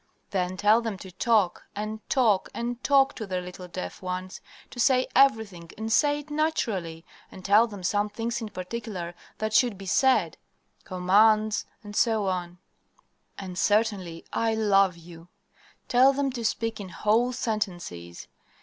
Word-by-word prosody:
"Then 185 -1 -1
tell 210 +4 +4
them 225 -4 -4
to 190 0 -11
talk, 200 -1 +1
and 215 +1 -4
talk, 220 -8 +2
and 240 +1 -4
talk, 275 -1 +4
to 220 - -5
their 185 -1 -2
little 180 0 -9
deaf 90 - -7
ones 185 0 -5 0.3
to 245 - -10
say 255 +2 +4
everything 220 -11 +2
and 220 +1 -4
say 290 +5 +3
it 295 +1 -16
naturally. 205 - -2 0.3
And 185 - -12
tell 210 +4 +5
them 205 -4 -9
some 205 +3 +1
things 230 +3 -3
in 220 - -5
particular 185 -3 -6 0.2
that 215 0 -3
should 235 -2 +3
be 195 - -9
said 205 - +2 0.5
commands, 215 +4 +3 0.2
etc., 195 -5 0 0.8
and 185 -2 -7
certainly 205 -6 0
'I 225 -1 +1
love 195 -4 +3
you.' 170 0 -13 0.6
Tell 260 +3 +5
them 275 0 -1
to 240 -2 -5
speak 225 0 -1
in 195 -2 -7
whole 215 +7 +1
sentences. 175 - -4
210 Hz, 150 wpm, -26 LUFS, 185-230 Hz, 0.8 s, tell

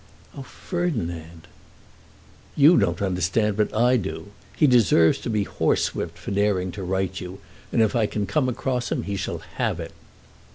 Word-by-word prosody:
"Oh, 140 - -7
Ferdinand!" 85 - -4 1.1
"You 150 +4 +7
don't 100 - +1
understand, 95 +3 0
but 105 0 0
I 125 +3 +3
do. 100 -2 -5 0.3
He 155 - +4
deserves 115 - +4
to - - -5
be 105 -2 +1
horsewhipped 85 -3 -1
for 90 - -7
daring 100 -2 +1
to 100 - -7
write 95 0 -1
to - - -5
you, 90 +2 -9 0.3
and 115 - +3
if 110 - 0
I 110 -3 +2
can 105 -1 -2
come 130 +7 0
across 125 0 -2
him - - -1
he 100 - -3
shall 95 -2 -3 0.2
have - - 0
it." - - -6
105 Hz, 170 wpm, -24 LUFS, 90-125 Hz, 1.1 s, You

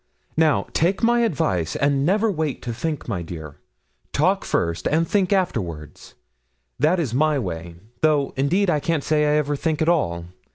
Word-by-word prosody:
Now, 160 -2 +3
take 185 +7 +1
my 240 +1 +4
advice, 95 - 0
and 140 0 +1
never 205 +7 +2
wait 155 -6 -3
to 120 - -3
think 150 +5 -4
my 90 - -2
dear; 80 -3 -8 0.5
talk - - +2
first, 85 0 -1
and 165 +2 +1
think 195 0 +1
afterwards, 90 - -2 0.6
that 170 +5 +3
is 140 -9 -2
my 150 +3 +2
way; 85 -8 -5 0.3
though, 150 -3 +2
indeed, 175 +9 +1
I 155 -4 +2
can't 160 -1 -1
say 150 -1 +2
I 150 0 +3
ever 145 -1 0
think 155 +1 -1
at 160 - +1
all. 85 - 0
150 Hz, 170 wpm, -22 LUFS, 115-165 Hz, 0.6 s, my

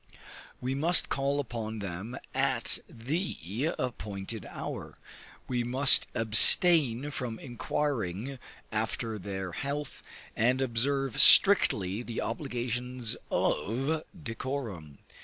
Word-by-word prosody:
We 130 +1 -3
must 165 +6 +2
call 140 +1 -1
upon 115 -4 -5
them 100 +4 -6 0.2
at - - 0
the 135 - -4
appointed 105 -4 -5
hour; - - -7 0.5
we 125 -1 -1
must 130 +3 +4
abstain 130 - +6
from 125 -5 -5
inquiring 125 -1 -4 0.3
after 110 0 -3
their 95 -1 -6
health, 140 - -5 0.3
and 125 +4 +1
observe 135 +1 0
strictly 105 - +6
the 120 -1 -6
obligations 125 -3 -4
of 135 +9 -1 0.2
decorum. 115 - -6
120 Hz, 95 wpm, -29 LUFS, 110-140 Hz, 0.5 s, abstain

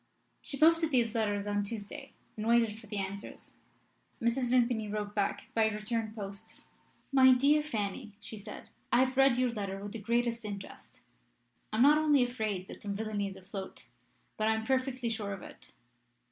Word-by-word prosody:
She 280 - -6
posted 325 +1 +5
these 240 -5 +2
letters 205 -3 0
on 205 0 0
Tuesday, 205 0 -6 0.2
and 215 0 -4
waited 230 -2 +3
for 225 - -14
the 210 0 -4
answers. 195 +1 -6 0.6
Mrs. 240 +2 +1
Vimpany 240 -3 +2
wrote 210 -1 -3
back 205 -2 -1
by 220 -1 +4
return 220 +1 -2
post. 200 +1 -8 0.5
"My 260 -1 +7
dear 285 +4 +4
Fanny," 215 -5 -4
she 215 +1 -9
said, 210 +1 -10 0.2
"I 245 - +5
have 260 0 -2
read 270 -2 +5
your 250 -1 +2
letter 195 -2 -4
with 205 - -6
the 225 - -6
greatest 235 +2 0
interest. 200 -2 -8 0.7
I 215 - -2
am 240 - +6
not 295 +2 +7
only 295 -4 +4
afraid 215 -6 -2
that - - -10
some 200 -1 -3
villainy 210 -1 -2
is 195 - -7
afloat, 190 0 -8 0.5
but 215 - +1
I 220 - +3
am 220 0 -3
perfectly 260 -1 0
sure 210 -3 -3
of 195 - -8
it. - - -13
220 Hz, 180 wpm, -31 LUFS, 205-250 Hz, 0.7 s, My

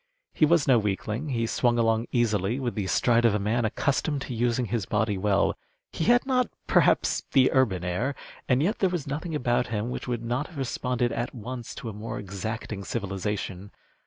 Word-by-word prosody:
He 155 - +4
was 170 -2 +3
no 125 -3 +6
weakling. 105 +7 -2
He 115 -3 0
swung 120 +1 +1
along 115 0 +2
easily 115 -1 +1
with 125 -3 -2
the 100 -4 -2
stride 120 +4 +3
of 115 -3 +4
a - - +1
man 110 +4 0
accustomed 140 +5 0
to 130 - -5
using 120 +1 +1
his 110 -2 -2
body 105 -1 +1
well. 100 +1 +2 0.4
He 160 - -1
had 245 +1 +4
not, 255 -2 +2 0.2
perhaps, - - +3
the 130 -2 +5
urban 105 -10 +2
air, 105 +11 -1 0.3
and 130 +2 +3
yet 205 +7 0
there 190 - +3
was 175 -5 -3
nothing 155 +4 -4
about 120 -3 +1
him 110 +2 -2
which - - -5
would 120 -2 -2
not 125 +6 -1
have 170 - -13
responded 125 -2 -1
at 120 +2 -3
once 120 +1 -6
to 115 - -6
a - - -6
more 105 +3 -5
exacting 100 +1 -5
civilization. 100 -2 -3
120 Hz, 195 wpm, -27 LUFS, 105-130 Hz, 0.4 s, no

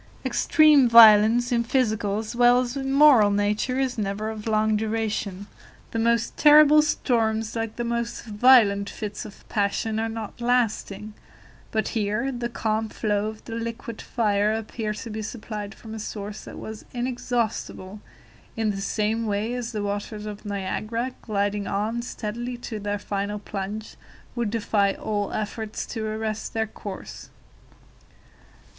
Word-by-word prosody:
Extreme 300 -5 +5
violence 230 +1 +7
in 235 -1 +2
physical, 220 -5 0
as 220 +1 -5
well 245 +1 +5
as 245 +1 -4
in 270 -1 -2
moral 275 -7 +7
nature, 205 +5 0
is 260 -3 -1
never 210 +2 -2
of 215 0 -7
long 215 0 +2
duration. 215 -3 -2 0.5
The 225 - -2
most 235 0 +1
terrible 300 0 +7
storms, 225 -7 0
like 225 -1 -3
the 240 - -3
most 235 0 -3
violent 210 -3 +5
fits 210 +2 -6
of 210 - -13
passion, 215 +2 -1
are 225 0 -1
not 225 +1 -7
lasting; 220 -4 0 0.6
but 220 -1 -1
here 220 +4 -1
the 240 -2 -3
calm 220 -1 -1
flow 210 -1 -1
of 215 0 -8
the 230 - -7
liquid 230 0 -5
fire 210 -3 +1
appeared 220 -1 -3
to 230 - -6
be 215 +1 -4
supplied 215 -2 -6
from 220 -1 -10
a 220 - -6
source 210 -1 -6
that - - -9
was 220 0 -8
inexhaustible, 240 -5 -3 0.6
in 220 -1 +1
the 195 -1 -5
same 220 +3 -1
way 210 +3 -1
as 245 -2 -4
the 210 -3 -3
waters 205 +1 -4
of 210 0 -8
Niagara, 215 +5 -3
gliding 205 -2 -1
on 215 +4 -1
steadily 240 +1 -5
to 230 -2 -6
their 205 0 -2
final 205 0 -3
plunge, 205 +1 -6 0.4
would 235 -3 -1
defy 205 -2 +1
all 205 -2 -2
effort 215 0 -4
to 225 -2 -4
arrest 215 0 -3
their 220 0 +1
course. 205 -2 -9
220 Hz, 150 wpm, -25 LUFS, 210-235 Hz, 0.6 s, violence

